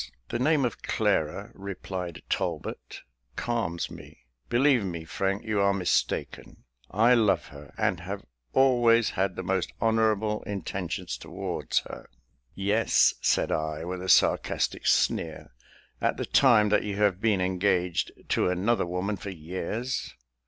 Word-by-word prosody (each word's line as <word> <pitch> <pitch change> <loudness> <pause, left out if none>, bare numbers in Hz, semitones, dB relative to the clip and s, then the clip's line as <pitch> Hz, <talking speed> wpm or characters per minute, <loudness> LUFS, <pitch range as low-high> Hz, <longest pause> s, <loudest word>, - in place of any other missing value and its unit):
"The 120 - -2
name 145 +1 +3
of 120 - -4
Clara," - - 0
replied 95 -3 -6
Talbot, - - -3 0.3
"calms 115 -8 -2
me; - - -12 0.3
believe 125 -1 +3
me, 85 -4 -5
Frank, 95 +5 -2
you 110 -3 0
are 100 0 +3
mistaken. 90 -3 -2 0.3
I 115 +5 +4
love 110 -5 +2
her, 70 0 -12
and 105 -5 +1
have 95 +3 -6 0.3
always 120 -4 +4
had 95 0 -1
the 95 - -5
most 95 -1 -1
honourable 110 -1 +1
intentions 95 -3 -4
towards - - -2
her." - - -10 0.5
"Yes," 105 +3 +3
said - - +2
I, 80 +1 -2
with 90 +1 -4
a 95 - -4
sarcastic - - +2
sneer, - - +1 0.5
"at - - +1
the - - -2
time 105 -1 +5
that 105 - +3
you 105 -1 -3
have 100 -2 +1
been 110 -4 +2
engaged 90 -1 0 0.2
to - - +2
another 95 +2 +1
woman 90 +4 -2
for 100 - -7
years. 95 +8 -4
100 Hz, 140 wpm, -27 LUFS, 90-110 Hz, 0.5 s, time